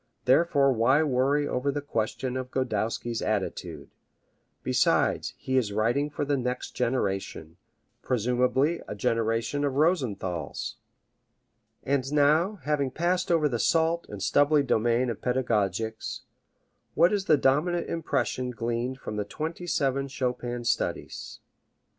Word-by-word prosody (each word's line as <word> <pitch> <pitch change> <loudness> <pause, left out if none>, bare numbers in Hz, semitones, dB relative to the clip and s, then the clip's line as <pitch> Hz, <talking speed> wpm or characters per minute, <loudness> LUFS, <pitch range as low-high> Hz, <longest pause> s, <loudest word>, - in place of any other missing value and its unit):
Therefore 140 0 +4
why 130 +6 +3
worry 140 +1 +1
over 130 +1 -1
the 145 - -2
question 125 -1 -2
of 130 -1 -4
Godowsky's 115 -2 -2
attitude! 105 -3 -3 0.7
Besides, - - +1
he 130 0 -1
is 115 -5 +1
writing 115 +8 +1
for 145 0 -3
the 145 0 +1
next 125 0 -3
generation 95 -9 -2 0.4
presumably 125 +6 +1
a - - -5
generation 115 +5 0
of 140 -2 0
Rosenthals. 110 - -1 1.1
And 135 0 0
now, 155 +7 +3
having 145 -3 0
passed 175 +6 0
over 160 -3 +3
the 120 -5 -2
salt 165 +3 +2
and 100 -2 -6
stubbly 145 0 +4
domain 120 0 +1
of 110 - -7
pedagogics, 110 -3 -1 0.7
what 170 +5 +5
is 200 -2 0
the 155 - +5
dominant 160 +6 +1
impression 140 -5 -1
gleaned 120 +2 -2
from 105 -5 -6
the 105 - 0
twenty 160 - -5
seven 135 -3 0
Chopin 125 -2 -3
studies? - - -3
130 Hz, 125 wpm, -27 LUFS, 115-145 Hz, 1.1 s, what